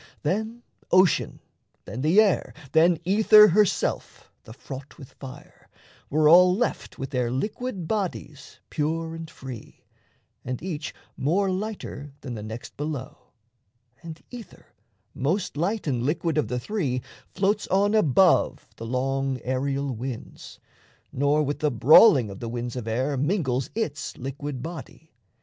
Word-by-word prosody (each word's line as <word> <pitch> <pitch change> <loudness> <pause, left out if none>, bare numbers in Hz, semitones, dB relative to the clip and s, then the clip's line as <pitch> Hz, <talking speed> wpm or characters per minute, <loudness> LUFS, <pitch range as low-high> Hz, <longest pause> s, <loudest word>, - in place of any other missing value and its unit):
Then 220 +8 -2 0.3
ocean, 185 -4 +3 0.4
then 115 +6 -6
the 160 +8 +4
air, 210 -4 +2 0.2
Then 165 +3 +4
ether 210 +2 +7
herself, 205 +2 0
the - - -11
fraught 135 +3 -10
with 135 -6 -12
fire, 130 -2 -12 0.4
were 155 +1 +3
all 180 +3 +7
Left 240 +4 -2
with 135 +1 -6
their 125 -3 0
liquid 195 - -3
bodies 165 -9 -4
pure 160 +2 -2
and 165 -1 -7
free, 130 -6 -10 0.6
And 125 0 -4
each 160 -4 -4 0.2
more 190 +7 +1
lighter 185 -8 -5
than 125 - -6
the 110 - -6
next 110 +2 -8
below; 145 -3 -4 0.9
And 165 -1 -9
ether, 240 -3 -12 0.4
most 170 +8 -1
light 195 +8 -1
and 130 -6 -1
liquid 155 +5 -1
of 150 -7 +1
the 125 +2 -2
three, 130 - -2 0.2
Floats 205 +2 0
on 200 +2 +2
above 185 - +3
the 115 - -7
long 135 +1 -1
aerial 135 +2 -1
winds, 125 +1 -8 0.5
Nor 145 +3 +2
with 145 0 -3
the 150 - +2
brawling 130 - +6
of 95 - -9
the 115 - -5
winds 120 +1 -4
of 120 -3 -5
air 130 +5 -1
Mingles 135 -5 0
its 160 -11 -3
liquid 135 0 -5
body. 160 0 -9
150 Hz, 140 wpm, -25 LUFS, 130-185 Hz, 0.9 s, ether